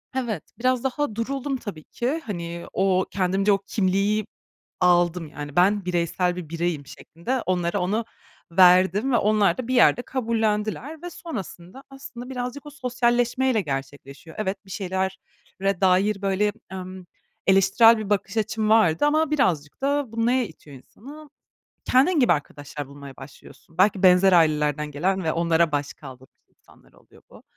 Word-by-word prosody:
Evet, 240 -5 -2 0.2
biraz 255 0 +1
daha 265 -3 -2
duruldum, 270 +4 -3
tabii 200 -10 -8
ki. 265 - -3
Hani, 170 -4 -6
o 190 -1 +2
kendimce 195 +1 +1
o 200 - +4
kimliği 200 +1 0 0.6
aldım, 175 -1 +2
yani, 145 -1 -8
ben 195 +2 +3
bireysel 175 0 0
bir 175 -4 -7
bireyim 165 -3 -2
şeklinde 235 - -5
onlara 175 -2 0
onu 210 +6 -1 0.5
verdim 185 +6 +5
ve - - +5
onlar 210 -1 +2
da 255 -2 -5
bir 255 - -1
yerde 245 0 +5
kabullendiler 230 +4 -2
ve 350 - -5
sonrasında, 250 - -8
aslında 260 -2 -10
birazcık 250 +2 -5
o - - -8
sosyalleşmeyle 245 -2 0
gerçekleşiyor. 140 0 -7
Evet, 195 -1 -3
bir 190 - -13
şeylere 190 0 -4
dair, 195 +2 +2
böyle, 200 +1 0 0.2
emm, 185 -1 -8 0.4
eleştirel 195 +4 +5
bir 215 -2 -5
bakış 200 +1 -1
açım 220 0 -1
vardı 215 - +4
ama 305 +1 +2
birazcık 170 - 0
da 285 -3 0
bu 230 0 0
neye 250 0 +2
itiyor 150 -4 -14
insanı? 285 - -14 0.6
Kendin 290 +6 +3
gibi 245 - +4
arkadaşlar 145 -2 -5
bulmaya 140 -1 -12
başlıyorsun. 160 +3 -15
Belki 190 0 +3
benzer 185 +1 +6
ailelerden 150 -3 +2
gelen 185 +6 -1
ve 160 - 0
onlara 170 -1 +1
başkaldırmış 135 -2 -6
insanlar - - -25
oluyor - - -22
bu. - - -16
195 Hz, 145 wpm, -24 LUFS, 170-240 Hz, 0.6 s, benzer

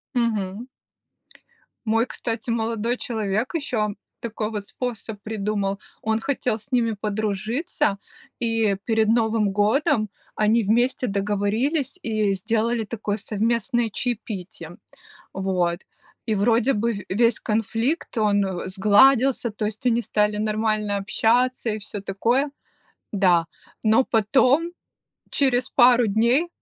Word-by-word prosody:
Мгм. 220 -2 -1 1.2
Мой, 225 +2 +2
кстати, 230 -1 -4
молодой 230 +1 -1
человек 220 - -2
еще 250 -10 -1 0.3
такой 220 -2 -4
вот 210 -2 -5
способ 225 -2 -5
придумал: 205 -2 -2 0.2
он 220 0 0
хотел 250 -2 -1
с 230 +5 -14
ними 235 -3 +2
подружиться, 215 - -1 0.4
и 225 -3 +1
перед 220 -2 +2
Новым 220 -2 +2
годом 215 - +2 0.3
они 220 +2 +3
вместе 240 +5 +1
договорились 215 - -1
и 215 -3 0
сделали 225 +3 0
такое 210 -1 -3
совместное 230 +3 0
чаепитие. 200 -7 -5 0.6
Вот, 180 -2 -1 0.5
и 220 - +1
вроде 230 +5 +2
бы 230 +2 0
в 205 -2 -6
весь 230 +4 +2
конфликт- 225 - -1
он 205 -2 +3 0.2
сгладился, 225 +7 +4
то 215 +1 -4
есть 215 +4 -4
они 240 -1 +3
стали 210 -1 +1
нормально 215 -1 0
общаться, 240 +4 +1
и 215 - -2
всё 205 -1 -7
такое. 235 +9 0 0.6
Да. 180 -5 +3 0.4
Но 225 +4 +4
потом, 265 +10 +2 0.6
через 260 -2 +1
пару 245 -1 +5
дней, 235 - +2
220 Hz, 115 wpm, -23 LUFS, 205-240 Hz, 1.2 s, пару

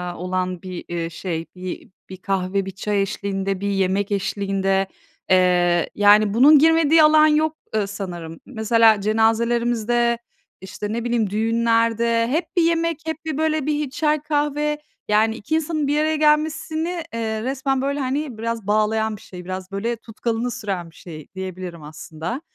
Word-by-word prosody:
olan 185 0 -3
bir, 185 -2 -7
eee, 170 -1 -3
şey, 165 0 -4
bir 180 0 -7 0.2
bir 185 - -8
kahve, 195 0 -1
bir 195 - -5
çay 200 +1 -1
eşliğinde, 195 -1 -2
bir 200 - -1
yemek 195 +1 0
eşliğinde. 195 -1 0 0.4
Eee, 180 -2 +3
yani, 205 0 +5
bunun 285 +6 +7
girmediği 320 0 +5
alan 310 0 +6
yok, 310 +1 +2 0.2
ııı, 210 -2 +1
sanırım. 175 -5 -7
Mesela 225 -3 +3
cenazelerimizde, 235 +2 +1 0.4
işte, 205 +3 -5
ne 235 - -2
bileyim 235 -4 0
düğünlerde 230 +1 +1
hep 315 +7 0
bir 345 - +6
yemek, 330 -1 +1
hep 320 0 -5
bir 310 -3 -3
böyle 310 -2 0
bir 300 -2 -1
çay, 300 +2 +1
kahve, 295 0 -1 0.3
yani, 220 +1 +2
2 255 +8 -3
insanın 310 -2 -1
bir 295 +1 +1
araya 315 0 +1
gelmesini, 315 +3 0
eee, 220 -1 -2
resmen, 265 0 -1
böyle, 280 +1 -1
hani, 270 -1 -2
biraz 230 -2 -4
bağlayan 215 +1 +1
bir - - -17
şey, 180 -1 -11
biraz 185 +1 -6
böyle 220 +5 -2
tutkalını 230 +1 -3
süren 195 -8 -4
bir - - -25
şey 155 -4 -10
diyebilirim 185 -3 -6
aslında. 155 - -6
225 Hz, 155 wpm, -22 LUFS, 195-290 Hz, 0.4 s, bunun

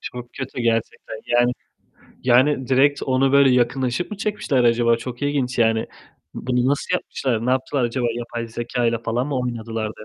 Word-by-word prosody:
Çok 125 -1 -8
kötü 130 -2 -5
gerçekten. 115 -1 -2
Yani, 120 +1 +3 0.7
yani 130 +2 +3
direkt 140 +2 +3
onu 135 +1 +2
böyle 140 -1 +6
yakınlaşıp 125 - 0
mı 210 - -5
çekmişler 195 -12 0
acaba? 115 0 +3
Çok 120 +2 -8
ilginç 135 -3 -1
yani. 115 -1 +2 0.5
Bunu 125 0 0
nasıl 145 - 0
yapmışlar, 120 -3 -2
ne - - +2
yaptılar 130 0 0
acaba, 120 +1 -1
yapay 120 -1 -5
zekayla 120 0 -1
falan 115 +3 -2
mı 140 -3 -2
oynadılar 115 -2 -3
de 110 - -11
125 Hz, 160 wpm, -22 LUFS, 115-130 Hz, 0.7 s, böyle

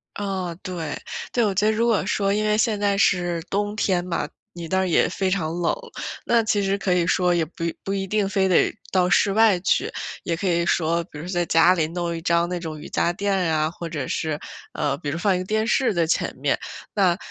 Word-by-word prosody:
啊， 190 -4 -3
对 170 -5 -4 0.4
对， 240 - +2
我 205 -3 +1
觉 200 +2 +1
得 215 - +4
如 230 +2 +1
果 225 -5 +2
说 200 0 +1
因 215 +1 0
为 210 0 +2
现 220 -2 +1
在 200 -1 +1
是 175 -4 +2
冬 205 +1 -1
天 185 -4 +1
嘛， 180 - -2 0.3
你 170 -1 -7
那 190 - +1
儿 190 0 +1
也 170 - +3
非 190 +1 -1
常 165 -4 -1
冷， 175 - +1 0.5
那 235 -1 +4
其 215 -2 +1
实 195 0 +1
可 195 -2 0
以 175 -1 +2
说 180 0 +2
也 170 - +2
不 165 +1 -6 0.2
不 195 - -2
一 195 -1 -2
定 210 0 +1
非 195 -1 +2
得 185 - +3 0.2
到 180 -1 +3
室 200 - +3
外 215 -3 +5
去。 180 - +1 0.3
也 170 - -1
可 190 - -2
以 170 -1 +2
说 170 0 +1
比 150 - -11
如 160 - -7
在 175 -1 0
家 165 +2 +5
里 165 -4 +1
弄 170 0 -3
一 165 - -5
张 170 +1 +2
那 180 0 -3
种 160 -2 -6
瑜 - - -9
伽 170 - +1
垫 200 +2 -1 0.2
啊， 155 0 +1
或 170 0 -7
者 145 -5 -4
是， 155 -2 -2 0.3
呃， 140 -2 -1
比 145 - -4
如 150 - -2
放 190 +2 +2
一 - - -1
个 - - -3
电 215 +3 0
视 255 -1 +2
在 170 -3 +1
前 - - 0
面。 - - +1 0.4
那， 185 -4 +3
180 Hz, 255 characters per minute, -23 LUFS, 170-200 Hz, 0.5 s, 外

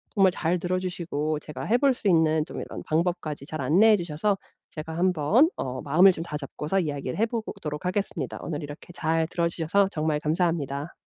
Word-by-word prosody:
정말 195 -2 +5
잘 175 0 0
들어주시고 175 -4 -2
제가 150 0 -8
해볼 255 +5 +3
수 230 - -4
있는 160 -3 +3
좀 - - -7
이런 - - -7
방법까지 160 -3 -1
잘 155 0 -5
안내해 195 +11 +5
주셔서 175 +3 0 0.4
제가 160 +1 -6
한번 185 - +3
어 130 0 -3
마음을 175 +7 +6
좀 165 - -5
다잡고서 150 +3 -3
이야기를 145 -3 -3
해보도록 205 -9 -3
하겠습니다. 195 +2 -2
오늘 155 -2 -4
이렇게 145 +4 -9
잘 160 -1 0
들어주셔서 170 +3 +1
정말 155 -2 0
감사합니다. 155 -2 -1
165 Hz, 395 characters per minute, -26 LUFS, 150-185 Hz, 0.4 s, 마음을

